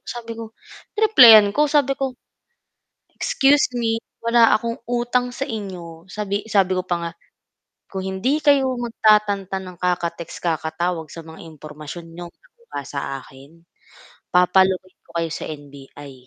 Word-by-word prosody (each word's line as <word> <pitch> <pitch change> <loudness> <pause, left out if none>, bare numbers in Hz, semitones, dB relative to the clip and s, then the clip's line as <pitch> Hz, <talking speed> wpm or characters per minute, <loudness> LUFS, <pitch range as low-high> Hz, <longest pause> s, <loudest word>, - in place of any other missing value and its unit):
sabi 230 -1 -6
ko 225 -1 -9 0.4
reneplayan 235 - +8
ko, 295 +6 +2
sabi 285 -2 +2
ko 265 -2 -3 1.0
"Excuse 275 -1 +2
me 225 -1 0 0.2
wala 230 0 +4
akong 230 +1 0
utang 245 +1 -1
sa 270 +3 -4
inyo" 180 -7 -7
sabi 205 -1 -3
sabi 190 -2 +2
ko 185 - -2
pa 175 -1 -1
nga 170 0 -4 0.8
"Kung 190 - -3
hindi 245 +11 0
kayo 280 -3 +3
magtatantan 210 -4 +1
ng - - -22
kaka-text 175 -2 -2
kakatawag 165 0 -2
sa 165 - -8
mga 160 0 -12
impormasyon 155 +1 -10
niyong 175 -1 -8
nakuha 475 - -11
sa 140 - -4 0.2
akin 135 +5 -17 0.7
papa-locate 185 +1 +2
ko - - -30
kayo 165 - -2
sa - - -5
NBI 145 -1 -11
195 Hz, 135 wpm, -21 LUFS, 170-240 Hz, 1.0 s, reneplayan